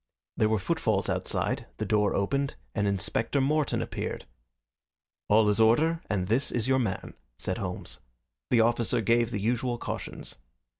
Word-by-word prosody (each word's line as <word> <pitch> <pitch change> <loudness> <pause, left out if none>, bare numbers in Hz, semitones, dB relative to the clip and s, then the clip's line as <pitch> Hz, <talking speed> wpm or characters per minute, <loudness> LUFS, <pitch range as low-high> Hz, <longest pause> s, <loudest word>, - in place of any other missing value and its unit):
There 110 - +2
were 110 - +2
footfalls 110 - 0
outside, - - -1
the - - -2
door 105 -1 +2
opened, 140 +8 0 0.2
and 100 -2 0
Inspector 100 +7 0
Morton 150 +2 +1
appeared. - - -4 1.0
"All 105 +1 +5
is 105 +1 +2
in 110 - +7
order 160 +8 +3
and 95 -3 0
this 120 +7 +1
is 120 -1 -1
your 130 0 +3
man," 100 -7 -2 0.2
said - - -3
Holmes. - - -5 0.5
The 120 - +5
officer 115 0 +2
gave 115 +1 +3
the 110 - -3
usual 120 +3 0
cautions. - - -6
115 Hz, 155 wpm, -28 LUFS, 105-130 Hz, 1.0 s, in